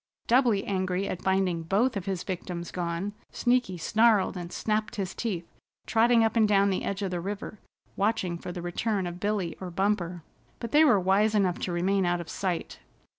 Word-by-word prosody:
Doubly 235 -5 +3
angry 185 0 -1
at 180 - -4
finding 190 -3 +1
both 210 +9 +1
of 195 -2 -4
his 190 -3 -2
victims 175 -2 -5
gone, 175 +3 -3 0.2
Sneaky 245 -7 +1
snarled 215 +3 +3
and 175 -1 -6
snapped 215 +1 -1
his 195 -4 -3
teeth, 185 -8 -3 0.4
trotting 230 0 +4
up 225 0 +1
and 220 -2 +4
down 200 -1 +3
the 185 - -1
edge 200 +1 -3
of 190 - -2
the 175 - -2
river, 200 +2 -5 0.4
watching 195 -4 0
for 180 - -6
the 175 -1 -6
return 195 +3 -1
of 175 0 -6
Billy 200 -3 -1
or 185 - -4
Bumper. 180 -2 -1 0.4
But 235 - -5
they 300 +2 +6
were 250 -10 +5
wise 200 +4 +2
enough 190 -4 +2
to 180 - -3
remain 185 +2 +1
out 175 0 +1
of 170 - -7
sight. 185 -4 -3
195 Hz, 190 wpm, -28 LUFS, 180-215 Hz, 0.4 s, they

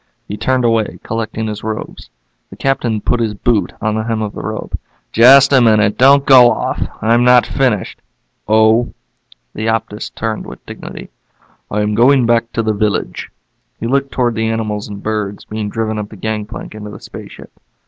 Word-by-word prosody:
He 105 - -5
turned 130 +2 0
away, 115 -2 0
collecting 110 0 -3
his 105 -1 -5
robes. 110 0 -6 0.4
The - - -11
Captain 120 -5 -1
put 120 - 0
his 110 -2 -1
boot 110 +1 0
on 110 0 -1
the 110 0 -2
hem 115 -1 -1
of 105 - -4
the - - -7
robe. 110 +1 -5 0.4
"Just 135 +4 +7
a 130 - +6
minute. 110 -2 +3
Don't 140 +2 +5
go 125 -3 +8
off. - - -2 0.2
I'm 115 +2 +3
not 125 0 +5
finished." 125 -8 -1 0.5
"Oh?" 110 +2 +3 0.6
The 110 +1 -4
Optus 110 -1 -3
turned 110 -1 -3
with - - -11
dignity. - - -9 0.6
"I 105 - -1
am 105 0 0
going 125 +3 +4
back 115 0 +1
to 115 - -1
the 110 0 0
village." 105 0 -2 0.5
He - - -4
looked 135 +3 0
toward 120 -2 0
the 110 0 -1
animals 110 -2 -3
and 100 -1 -9
birds 105 -2 -3
being 105 -1 -4
driven 110 0 -2
up 105 -1 -5
the - - -11
gangplank 105 +1 -5
into 105 -1 -8
the 105 - -10
spaceship. - - -11
110 Hz, 180 wpm, -16 LUFS, 105-120 Hz, 0.6 s, go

